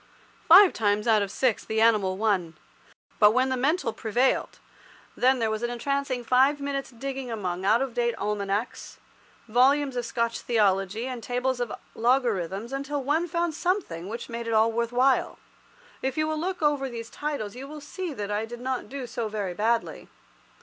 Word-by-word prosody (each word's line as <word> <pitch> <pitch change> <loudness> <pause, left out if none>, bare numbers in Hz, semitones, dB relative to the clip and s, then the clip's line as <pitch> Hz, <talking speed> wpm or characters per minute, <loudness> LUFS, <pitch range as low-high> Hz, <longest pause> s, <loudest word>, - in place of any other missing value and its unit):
Five 370 +3 +9
times 210 0 0
out 220 -2 +4
of 200 - -2
six 245 +2 0
the 220 0 -2
animal 210 -5 +3
won. 190 -6 0 0.6
But 210 0 +6
when 260 +1 +3
the 260 - 0
mental 270 -1 0
prevailed, 240 +4 0 0.6
then 260 +1 +3
there 225 -2 0
was 215 0 -2
an 240 - -1
entrancing 260 +1 -2
five 265 +4 +3
minutes' 280 -1 -3
digging 265 +1 -6
among 190 -5 -3
out 225 +6 +4
of 265 -3 -5
date 235 -1 0
almanacs, 205 +2 -3 0.5
volumes 265 +4 +3
of 245 - -1
Scotch 235 0 -1
theology, 205 -1 +1
and 255 -2 -5
tables 250 +2 -1
of 245 -3 -2 0.2
logarithms, 230 -3 0
until 280 +1 -3
one 310 +6 +1
found 340 0 -1
something 305 - -2
which 230 +2 -6
made 235 -1 -5
it 230 - -1
all 220 +1 +4
worth 235 +1 -1
while. 255 +2 +2 0.6
If 265 +1 -2
you 310 0 +1
will 310 0 -2
look 360 0 -3
over 285 -3 +1
these 230 -1 -7
titles, 285 -9 -4
you 265 +2 -8
will 300 +1 -8
see 340 +4 -6
that 210 -6 -5
I 210 +2 -1
did 240 +1 -8
not 255 +1 -3
do 275 -1 -5
so 235 -1 -4
very 205 -4 -3
badly. 230 +4 -1
240 Hz, 180 wpm, -26 LUFS, 220-275 Hz, 0.6 s, Five